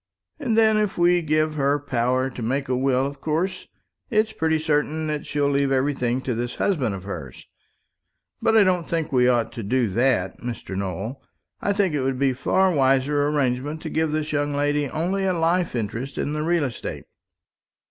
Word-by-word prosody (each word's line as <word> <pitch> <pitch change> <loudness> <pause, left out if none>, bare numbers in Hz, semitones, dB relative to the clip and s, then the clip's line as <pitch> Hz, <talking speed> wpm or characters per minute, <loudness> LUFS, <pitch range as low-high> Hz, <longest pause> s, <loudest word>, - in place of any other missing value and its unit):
And 240 -7 0
then, 220 -1 +5
if 210 -2 -1
we 175 0 +4
give 155 0 +1
her 140 -1 +1
power 130 -1 0
to 125 - -8
make 135 +5 -1
a 130 - 0
will, 130 0 +2
of 140 0 -6
course 165 +5 -2 0.4
it's 215 -2 +2
pretty 160 -5 +1
certain 155 0 0
that 150 -1 -3
she'll 145 -1 0
leave 140 -1 +1
everything 130 -2 0
to 130 - -2
this 120 +1 -3
husband 135 - 0
of 95 - -8
hers. 80 -10 -7 1.0
But 225 0 +3
I 215 - +7
don't 180 -3 +1
think 165 -3 -1
we 125 -2 +4
ought 120 -3 +2
to 120 - -6
do 120 +2 +1
that, 105 -3 +1
Mr. 120 -5 -6
Nowell. 100 +6 -4 0.4
I 205 - +1
think 200 -4 +1
it 145 - 0
would 130 0 -1
be 135 0 +2
a - - -3
far 185 +8 +2
wiser 140 +1 +2
arrangement 145 +1 -1
to - - -5
give 160 -1 0
this 155 0 -2
young 145 -1 0
lady 145 0 0
only 180 +7 -1
a 185 -1 +1
life 170 -1 +1
interest 120 +4 -4
in 145 - -1
the 150 - -2
real 170 0 +1
estate. 130 -5 -5
145 Hz, 195 wpm, -23 LUFS, 125-160 Hz, 1.0 s, I